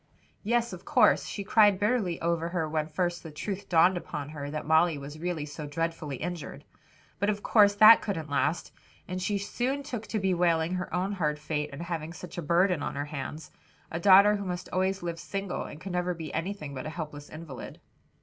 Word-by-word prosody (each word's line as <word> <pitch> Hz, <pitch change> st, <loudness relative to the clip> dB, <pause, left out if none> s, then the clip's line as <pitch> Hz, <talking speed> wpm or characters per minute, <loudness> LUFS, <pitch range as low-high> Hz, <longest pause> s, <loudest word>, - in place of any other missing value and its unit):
"Yes, 235 Hz, 0 st, 0 dB
of 180 Hz, 0 st, -9 dB
course, -, -, +4 dB
she 200 Hz, -, -4 dB
cried 205 Hz, -1 st, +5 dB
bitterly 205 Hz, -5 st, +1 dB
over 170 Hz, 0 st, 0 dB
her 170 Hz, -3 st, -1 dB
when 155 Hz, 0 st, -1 dB
first 175 Hz, +2 st, -1 dB
the 165 Hz, -, -9 dB
truth 190 Hz, +6 st, -5 dB
dawned 175 Hz, +2 st, +5 dB
upon 150 Hz, -4 st, -5 dB
her 145 Hz, -2 st, -6 dB
that 155 Hz, +1 st, -4 dB
Molly 160 Hz, +1 st, +4 dB
was 145 Hz, +2 st, -8 dB
really 170 Hz, -3 st, -2 dB
so 150 Hz, 0 st, -7 dB
dreadfully 165 Hz, -1 st, -3 dB
injured; 175 Hz, +3 st, -6 dB, 0.5 s
but 200 Hz, +2 st, +1 dB
of 205 Hz, -1 st, -2 dB
course 205 Hz, -2 st, +5 dB
that 215 Hz, +2 st, +9 dB
couldn't 165 Hz, -7 st, -3 dB
last 145 Hz, +3 st, 0 dB, 0.4 s
and 185 Hz, +1 st, -4 dB
she 200 Hz, +3 st, 0 dB
soon 250 Hz, +7 st, -2 dB
took 240 Hz, -6 st, -6 dB
to 220 Hz, -, -2 dB
bewailing 175 Hz, -3 st, +1 dB
her 180 Hz, 0 st, -3 dB
own 185 Hz, +2 st, -1 dB
hard 155 Hz, -7 st, -1 dB
fate 150 Hz, 0 st, -3 dB
in 140 Hz, +3 st, -8 dB
having 165 Hz, -2 st, -4 dB
such 175 Hz, +1 st, -8 dB
a -, -, -2 dB
burden 175 Hz, +1 st, +2 dB
on -, -, -3 dB
her 145 Hz, +1 st, -2 dB
hands, 150 Hz, +1 st, -6 dB, 0.4 s
a 165 Hz, -, -3 dB
daughter 200 Hz, +3 st, +7 dB
who 200 Hz, -, -5 dB
must 180 Hz, -1 st, -4 dB
always 190 Hz, 0 st, 0 dB
live 170 Hz, -1 st, -4 dB
single 195 Hz, 0 st, -4 dB
and 150 Hz, -, -9 dB
could 190 Hz, +3 st, -7 dB
never 180 Hz, 0 st, -1 dB
be 160 Hz, -2 st, -7 dB
anything 165 Hz, -4 st, -4 dB
but 130 Hz, +1 st, -5 dB
a -, -, -3 dB
helpless 150 Hz, -3 st, -7 dB
invalid." 155 Hz, -5 st, -9 dB
175 Hz, 205 wpm, -28 LUFS, 155-195 Hz, 0.5 s, that